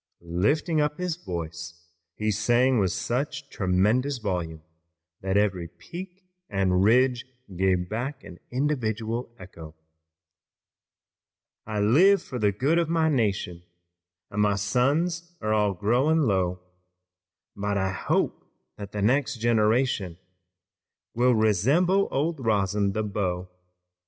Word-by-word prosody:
Lifting 145 - +1
up 150 +1 -1
his 180 -3 -2
voice 85 - -6 0.4
he 110 0 -1
sang 120 +4 +2
with 95 -3 +1
such 140 +3 -3
tremendous 105 +9 +1
volume 90 -7 -4 0.6
that 95 +1 0
every 95 -4 +1
peak 180 - -10 0.3
and 95 -2 +1
ridge 125 +3 +3 0.3
gave 90 -1 +1
back 130 +7 -4
an 90 - -12
individual 120 -4 -2
echo: 85 -4 -11 1.9
"I 105 -2 -2
live 175 - +5
for 125 - -7
the 105 -2 +3
good 140 - +1
of 165 -2 0
my 165 -1 +2
nation, 100 - -1 0.7
And 105 - -1
my 105 -1 +3
suns 155 - 0
are 110 0 -1
all 105 -2 +1
growing 125 - +2
low, 95 -7 0 0.9
But 100 0 -2
I 95 0 0
hope 95 - -1 0.3
that 100 -1 -8
the 105 -1 -2
next 135 +4 +2
generation 110 -4 +1 1.0
Will 125 +1 +3
resemble 140 - +3
old 145 0 -1
Rosin, 100 -2 +1
the 110 - -1
beau. 90 -3 -3
110 Hz, 120 wpm, -26 LUFS, 95-135 Hz, 1.9 s, live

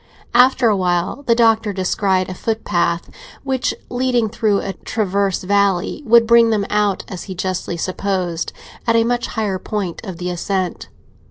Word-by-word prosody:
After 250 0 +5
a 215 - +3
while 180 +5 0
the 230 - +4
Doctor 225 -2 +3
descried 185 0 0
a 185 - -5
footpath 175 -5 -1 0.4
which, 265 -2 0 0.2
leading 245 -3 0
through 215 -2 +1
a 195 - -4
transverse 200 -3 -1
valley, 200 - +1
would 230 +1 +6
bring 235 0 +5
them 210 -3 +1
out, 210 -2 +1
as 185 - -7
he 190 - -7
justly 185 -1 -3
supposed, 180 -2 -2 0.4
at 230 - +3
a 230 - +4
much 240 +1 -1
higher 205 -4 -2
point 200 -4 -4
of 190 -6 -7
the 180 +1 -3
ascent. 185 0 -3
200 Hz, 160 wpm, -19 LUFS, 185-230 Hz, 0.4 s, would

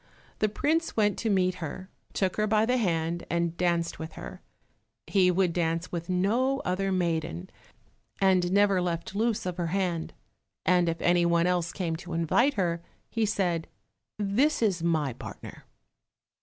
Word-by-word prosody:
The 215 - +2
prince 315 +9 0
went 210 -1 +2
to 225 - -1
meet 185 -2 +2
her, 165 +4 -5 0.3
took 190 -2 0
her 215 0 +2
by 215 +1 +3
the 250 +2 +2
hand 170 -5 0
and 170 -1 0
danced 170 -1 0
with 160 0 -6
her. - - -9 0.6
He 190 -2 +3
would 180 -1 +2
dance 165 0 -1
with 170 0 -4
no 230 +9 +1
other 195 +2 0
maiden, 170 0 -1 0.7
and 185 -2 +3
never 200 -1 +4
left 170 0 -3
loose 220 0 0
of 180 -1 -3
her 175 -2 -1
hand, 175 -2 -2 0.5
and 175 0 +4
if 165 - -3
any 175 0 +4
one 170 0 +3
else 180 -2 +1
came 170 -4 -2
to 175 +1 -8
invite 170 - +2
her, 170 -4 0 0.3
he 225 -2 +1
said, 180 -6 0 0.5
"This 225 +8 +1
is 190 -6 +1
my 160 -6 +1
partner." - - -10
180 Hz, 160 wpm, -28 LUFS, 170-200 Hz, 0.7 s, never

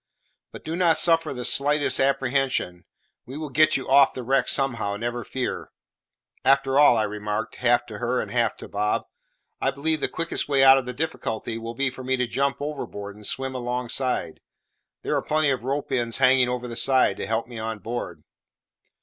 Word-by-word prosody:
But - - -11
do 160 - -4
not 170 -2 +3
suffer 165 -2 +3
the 125 -2 -5
slightest 145 +1 +2
apprehension; 135 -9 0 0.4
we 130 +3 -7
will 155 -2 -6
get 155 +3 +4
you 130 - -7
off 135 0 +5
the 130 - -5
wreck 135 +3 +1
somehow, 115 -7 0
never 120 +2 -3
fear. 130 +3 -4 0.7
After 135 0 +3
all," 145 -5 +6
I 110 - +2
remarked, 105 +1 -4
half 120 -1 +2
to 105 -3 -9
her 125 +2 0
and - - -4
half 120 -2 0
to - - -10
Bob, 105 +1 -1 0.6
"I - - +2
believe 155 +3 -1
the - - 0
quickest 165 -2 -3
way 135 -2 +4
out 135 0 +8
of 130 - -8
the - - -3
difficulty 115 -6 -4
will 115 +1 -7
be 135 +1 0
for 130 0 -10
me 130 +1 0
to 125 - +1
jump 135 +2 -1
overboard 105 -9 -6
and 105 0 -5
swim 135 -1 -2
alongside; 125 -5 -3 0.6
there - - -1
are - - +1
plenty 155 -1 +1
of 130 -3 -2
ropes 140 +2 -3
ends 120 -3 0
hanging 130 -1 +4
over 125 0 -3
the 120 - -7
side 130 +2 +3
to - - -4
help 110 +2 -1
me 120 -2 -9
on 110 0 -4
board." 115 +5 -6
130 Hz, 195 wpm, -24 LUFS, 115-140 Hz, 0.7 s, out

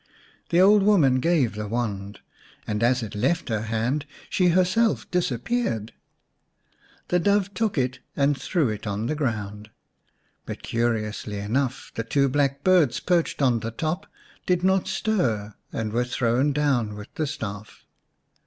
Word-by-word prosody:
The 170 - +3
old 200 +2 +7
woman 165 -11 +4
gave 155 -6 +2
the 105 0 -5
wand, 100 -3 -3 0.4
and 105 0 -2
as 125 +1 +2
it 105 - -6
left 125 +12 0
her 110 -2 0
hand 115 +7 -1 0.2
she 180 - +3
herself 185 +6 +2
disappeared. 135 - -1 1.2
The 180 - +3
Dove 200 +2 +2
took 215 -2 -1
it 130 -1 0 0.2
and 140 0 +2
threw 150 -1 0
it 105 0 -5
on 100 +2 -2
the 130 - 0
ground, 105 -7 -3 0.8
but - - -6
curiously 110 -3 -1
enough 125 +6 -2
the 115 - -3
two 140 +4 +2
black 140 0 0
birds 175 -10 +4
perched 170 -5 0
on 120 -3 +3
the 115 - -4
top 160 - -3 0.4
did 180 -1 +2
not 190 0 +2
stir 115 - 0 0.2
and 110 -1 -3
were 120 +1 +2
thrown 125 +3 +1
down 135 -7 +1
with 105 0 -10
the 155 - -2
staff. 105 -8 -7
130 Hz, 150 wpm, -25 LUFS, 110-175 Hz, 1.2 s, old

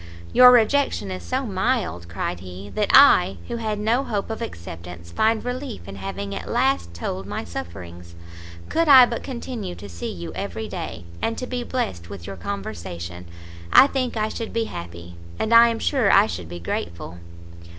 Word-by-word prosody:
"Your 250 0 +9
rejection 245 - +3
is 90 0 -5
so 85 - -2
mild," 85 +1 -1
cried 85 0 -3
he, 95 +2 -9
"that - - 0
I, 95 - +7
who 235 - -4
had 215 -2 -2
no 225 +5 +1
hope 210 -3 -3
of 225 - -5
acceptance, 85 - -8
find 220 - +1
relief 250 - -5
in 100 0 -8
having 95 +1 -5
at - - -6
last 240 - 0
told 95 +3 -4
my 105 - -4
sufferings. 85 +1 -8 0.5
Could 330 0 +1
I 265 -3 +10
but 235 -1 -4
continue 235 -7 -6
to 100 - -10
see 85 -3 -6
you 85 -2 -7
every - - -5
day, 80 +1 -6 0.2
and 225 - -1
to 255 - -3
be 250 -1 -3
blest 95 - -3
with 100 -4 -8
your 100 - -6
conversation, 85 -2 -6 0.5
I - - +9
think 255 -4 -2
I 215 0 0
should 230 0 -5
be 230 - +1
happy, 85 - -8 0.2
and 220 - 0
I 230 0 +9
am 230 -1 -1
sure 245 -5 +2
I - - +7
should 85 -1 -6
be 85 0 -7
grateful." 85 0 -5
100 Hz, 180 wpm, -23 LUFS, -, 0.5 s, I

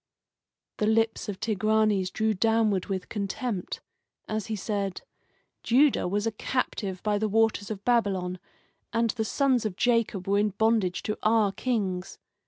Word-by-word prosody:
'" - - -63
The 210 - +2
lips 225 0 +1
of 195 - -5
Tigranes 215 -3 +1
drew 220 +3 0
downward 215 -2 +2
with 190 -2 -3
contempt, 205 -1 -3 0.5
as 215 -2 -3
he 220 - -2
said: 200 -2 -3 0.6
"Judah 265 -2 +3
was 205 +3 -1
a 225 - +1
captive 210 -5 -3
by 210 -1 +1
the 215 0 0
waters 220 -1 +2
of 205 -2 -6
Babylon, 190 -7 +1 0.5
and 230 0 +1
the 225 0 -2
sons 260 +1 +2
of 215 -4 -3
Jacob 230 -5 +1
were 200 +1 +3
in 210 +1 +2
bondage 220 -5 +2
to 210 - -3
our 215 -2 +3
kings. 195 -6 -2
215 Hz, 155 wpm, -27 LUFS, 195-225 Hz, 0.6 s, Judah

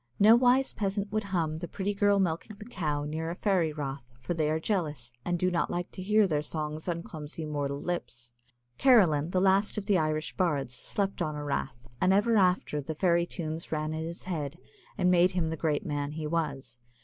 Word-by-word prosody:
No 215 +3 +7
wise 250 +2 +3
peasant 200 0 -2
would 215 -1 -1
hum 165 -5 -1
"The 175 - -5
Pretty 200 +3 -2
Girl 205 0 +3
milking 185 +3 -1
the 210 - -10
Cow" 155 -10 -2
near 160 +2 -3
a 170 - -4
fairy 180 -5 +1
rath, 135 -4 -6
for 130 +8 -3
they 155 -2 0
are 155 +1 +1
jealous, 150 - -2
and 175 0 0
do 185 +1 +1
not 170 - 0
like 175 0 -3
to 185 - -8
hear 210 +2 +4
their 155 -5 0
songs 155 +1 -4
on 170 -1 -2
clumsy 155 0 -7
mortal 145 -2 -2
lips. 120 -9 -5 0.5
Carolan, 180 - +5
the 185 - +1
last 195 +3 +3
of 205 - -3
the 200 -3 +3
Irish 155 0 -1
bards, 145 -9 0
slept 195 +10 -2
on 155 -1 -1
a 150 - -4
rath, 120 -4 -3
and 185 +1 +4
ever 225 +4 +3
after 180 -6 +2
the 155 +3 -5
fairy 170 0 +2
tunes 160 -2 -5
ran 155 0 -1
in 160 0 -3
his 170 +1 -6
head, 160 -4 -4 0.4
and 180 -1 +3
made 180 +1 +4
him 165 -3 0
the - - -2
great 155 -2 -1
man 145 -1 -2
he 155 0 -4
was. 140 -6 -3
165 Hz, 210 wpm, -29 LUFS, 150-190 Hz, 0.5 s, No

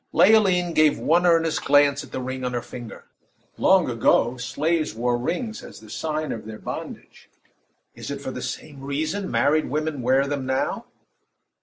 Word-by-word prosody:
Leoline 185 -5 +4
gave 155 -2 +4
one 175 +3 +2
earnest 165 -2 +2
glance 145 0 +4
at 135 - -14
the - - -4
ring 130 0 -5
on 125 0 -2
her 120 - -1
finger. 120 -3 -10 0.5
Long 190 -3 +4
ago, 120 0 +2
slaves 150 +5 -1
wore 120 +1 0
rings 200 - -3
as - - -11
the 110 -1 -14
sign 155 +4 -3
of 110 -1 -6
their 110 -1 -7
bondage - - -8 0.6
is - - -8
it - - -4
for - - -5
the - - -6
same 145 -3 -6
reason 155 +8 -3
married 155 +2 +2
women 155 -1 -2
wear 130 +3 +3
them 140 -1 -3
now? 130 0 -2
145 Hz, 170 wpm, -24 LUFS, 125-165 Hz, 0.6 s, Leoline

